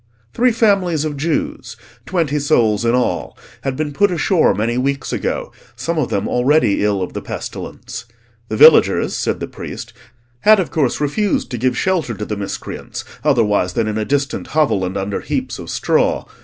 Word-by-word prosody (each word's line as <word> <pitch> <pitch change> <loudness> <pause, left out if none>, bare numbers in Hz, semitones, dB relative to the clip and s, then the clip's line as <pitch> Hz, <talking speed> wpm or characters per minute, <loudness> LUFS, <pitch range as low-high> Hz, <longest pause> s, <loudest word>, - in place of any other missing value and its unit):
Three 250 +1 +3
families 195 -9 +2
of 150 -1 -3
Jews, 285 - -2 0.3
twenty 160 -5 0
souls 120 -8 +2
in 115 +1 +3
all, 90 -10 -1 0.2
had 135 -1 -2
been 150 0 -3
put 205 +7 +3
ashore 175 0 +2
many 115 +3 0
weeks 135 +2 -1
ago, - - -2 0.2
some 165 -1 -2
of 140 - 0
them 100 0 -1
already 125 -4 +2
ill 100 -2 +1
of - - -6
the - - -4
pestilence. - - -7 0.4
The 110 - -2
villagers, - - +6
said - - -1
the - - -3
priest, - - -8 0.5
had 215 +7 +6
of 180 - -2
course 140 -6 0
refused 175 +8 0
to 120 - -3
give 125 +1 +1
shelter 175 -11 0
to 105 +2 -5
the 105 - -3
miscreants, 100 -1 -6 0.2
otherwise 105 -10 +2
than 115 +1 0
in 110 0 -1
a - - 0
distant 140 +4 -1
hovel, 110 -11 +3
and 95 +2 -3
under 100 +1 -2
heaps - - -3
of - - -8
straw. - - +1
140 Hz, 180 wpm, -18 LUFS, 110-165 Hz, 0.5 s, villagers